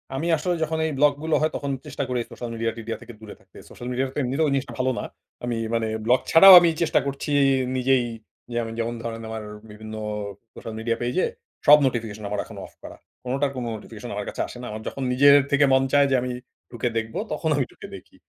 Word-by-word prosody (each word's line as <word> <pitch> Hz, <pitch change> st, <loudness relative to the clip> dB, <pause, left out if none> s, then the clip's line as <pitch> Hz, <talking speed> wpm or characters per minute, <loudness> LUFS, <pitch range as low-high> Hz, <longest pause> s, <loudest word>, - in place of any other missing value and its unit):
আমি 155 Hz, +6 st, -2 dB
আসলে 175 Hz, +4 st, -1 dB
যখন 160 Hz, +1 st, -2 dB
এই 160 Hz, -, -1 dB
ব্লকগুলো 150 Hz, +2 st, +2 dB
হয়, 155 Hz, -, +1 dB
তখন 140 Hz, -1 st, -3 dB
চেষ্টা 140 Hz, -, -4 dB
করি 125 Hz, -1 st, 0 dB
সোশ্যাল 120 Hz, -, -6 dB
মিডিয়া-টিডিয়া 115 Hz, 0 st, -3 dB
থেকে 120 Hz, -, -11 dB
দূরে 110 Hz, -1 st, -10 dB
থাকতে। -, -, -20 dB
সোশ্যাল 120 Hz, -, -9 dB
মিডিয়া 130 Hz, +2 st, 0 dB
তো -, -, -9 dB
এমনিতেও 135 Hz, +5 st, 0 dB
ওই -, -, 0 dB
জিনিসটা 135 Hz, 0 st, -2 dB
ভালো 130 Hz, 0 st, +2 dB
না। -, -, -4 dB, 0.4 s
আমি 120 Hz, -1 st, -2 dB, 0.2 s
মানে 115 Hz, -1 st, 0 dB, 0.2 s
ব্লগ 125 Hz, +2 st, +4 dB
ছাড়াও 190 Hz, +4 st, +10 dB
আমি 175 Hz, -1 st, +3 dB
চেষ্টা 165 Hz, -, +3 dB
করছি 140 Hz, +2 st, -4 dB, 0.5 s
নিজেই 130 Hz, -1 st, +2 dB, 0.5 s
যে 120 Hz, -, 0 dB, 0.2 s
যেমন 115 Hz, +1 st, -1 dB
ধরেন 115 Hz, -1 st, -5 dB
আমার 110 Hz, -1 st, -5 dB, 0.3 s
বিভিন্ন 110 Hz, +1 st, -9 dB, 0.6 s
সোশ্যাল 115 Hz, -, -8 dB
মিডিয়া 115 Hz, +1 st, -1 dB
পেজে, 125 Hz, +10 st, 0 dB, 0.4 s
সব 150 Hz, +1 st, +10 dB
নোটিফিকেশন 110 Hz, -4 st, -3 dB
আমার 105 Hz, 0 st, -2 dB
এখন -, -, -12 dB
অফ -, -, -16 dB
করা। -, -, -10 dB, 0.3 s
কোনোটার 135 Hz, +3 st, -1 dB
কোনো 125 Hz, -2 st, -4 dB
নোটিফিকেশন 105 Hz, -, -9 dB
আমার -, -, -4 dB
কাছে -, -, -4 dB
আসে -, -, -10 dB
না। -, -, -7 dB
আমার 110 Hz, +1 st, -6 dB
যখন 135 Hz, -, -4 dB
নিজের 140 Hz, +3 st, +7 dB, 0.2 s
থেকে 145 Hz, 0 st, +5 dB
মন 130 Hz, 0 st, +4 dB
চায় 145 Hz, -1 st, +6 dB
যে, -, -, +4 dB
আমি 125 Hz, 0 st, -3 dB, 0.4 s
ঢুকে 120 Hz, 0 st, -2 dB
দেখব, 110 Hz, 0 st, -3 dB, 0.2 s
তখন 160 Hz, -, -2 dB
আমি 140 Hz, -, +1 dB
ঢুকে -, -, -11 dB
দেখি। -, -, -14 dB
125 Hz, 215 wpm, -24 LUFS, 115-145 Hz, 0.6 s, ছাড়াও